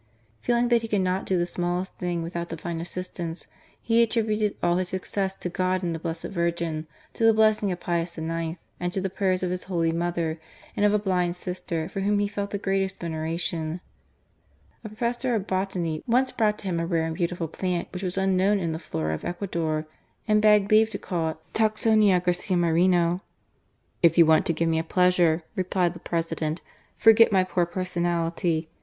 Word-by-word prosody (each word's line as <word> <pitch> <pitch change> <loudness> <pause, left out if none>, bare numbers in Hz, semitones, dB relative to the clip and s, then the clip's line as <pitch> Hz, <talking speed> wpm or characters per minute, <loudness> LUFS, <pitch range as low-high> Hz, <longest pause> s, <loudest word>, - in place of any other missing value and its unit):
Feeling 240 0 +1
that 235 -1 +4
he 225 - -4
could 205 -3 +1
not 185 +1 -1
do 190 - +2
the 175 - +1
smallest 175 +1 -2
thing 175 -2 -2
without 170 +1 -4
Divine 165 0 -4
assistance, 175 -1 -5 0.3
he 230 0 +3
attributed 215 -2 +1
all 175 0 +3
his 185 -1 -1
success 190 +1 -2
to - - -5
God 185 +1 -1
and 170 -1 -1
the 165 - -4
Blessed 165 0 -4
Virgin, 170 -3 -2 0.3
to - - -3
the 225 -1 +6
blessing 215 -2 +3
of 180 - -4
Pius 170 -1 -2
IX., 165 +1 -3 0.2
and 175 0 -2
to - - -1
the 190 -1 -2
prayers 185 -1 0
of 180 - 0
his 180 0 -3
holy 170 -3 0
mother 170 -1 -1 0.4
and 205 - 0
of 205 - +2
a - - +5
blind 180 -4 0
sister 180 -3 -4
for 195 - -5
whom 205 +1 +1
he 205 0 +1
felt 200 0 -4
the 200 - -3
greatest 195 -1 -1
veneration. 165 0 -3 1.0
A - - -5
professor 240 +3 -1
of 205 -3 -1
botany 185 -5 -2
once 255 +2 +3
brought 210 -2 +1
to - - -9
him 175 -3 -1
a 165 - -1
rare 165 -2 +1
and 165 - -2
beautiful 175 -1 -2
plant 180 +2 -2
which 180 - -5
was 185 -1 -3
unknown 190 +1 +3
in 170 -4 -1
the 160 - -4
flora 80 - -3
of 80 - -5
Ecuador, 170 -4 -2 0.4
and 215 -1 +4
begged 210 -1 +4
leave 220 +1 +6
R - - -17
GARCM - - -18
MORENO. 165 -3 0
to - - -22
call 160 - -33
it - - -34
Tacsonia 215 -3 +3
Garcia 180 +1 0
Mnreno. 175 +1 +3 0.4
" - - -43
If 170 0 +4
you 170 - +8
want 160 0 +4
to 170 - +2
give 165 +1 0
me 160 0 +2
a - - -1
pleasure," 175 -1 +3
replied 185 -2 0
the 175 - -10
President, 165 -1 -2 0.2
" - - -36
forget 225 0 +6
my 190 -2 +4
poor 180 -1 0
personality. 170 -2 -1
180 Hz, 205 wpm, -26 LUFS, 170-195 Hz, 1.0 s, you